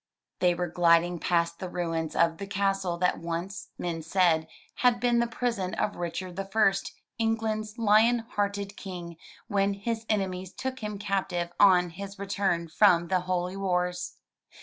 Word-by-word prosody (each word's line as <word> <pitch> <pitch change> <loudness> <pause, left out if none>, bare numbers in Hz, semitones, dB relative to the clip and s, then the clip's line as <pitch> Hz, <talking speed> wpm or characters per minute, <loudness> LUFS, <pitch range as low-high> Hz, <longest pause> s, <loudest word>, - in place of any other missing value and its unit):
They 180 -1 +3
were 180 - -1
gliding 170 0 +3
past 170 -1 0
the 185 - -5
ruins 165 -3 -2
of 165 +1 +2
the 200 - -5
castle 195 -3 0
that 180 +1 +1
once, 170 +5 -5
men 170 -2 -3
said, 165 -1 +2 0.3
had 245 -1 +3
been 240 -1 +2
the 235 - +2
prison 225 -6 -2
of 205 - -1
Richard 175 +1 -5
the 195 - -2
First, 195 -1 +1 0.3
England's 220 -1 -1
Lion 225 +2 +4
Hearted 200 -1 -2
King, 175 -4 -7 0.3
when 200 0 +1
his 225 +2 -4
enemies 190 -3 -1
took 260 0 -4
him 210 -1 -4
captive 190 -4 -2
on 180 -3 +6
his 195 +3 -8
return 195 -4 -1
from 170 0 +4
the 185 - +3
holy 180 0 -2
wars. 180 -2 -1
190 Hz, 155 wpm, -28 LUFS, 175-205 Hz, 0.3 s, on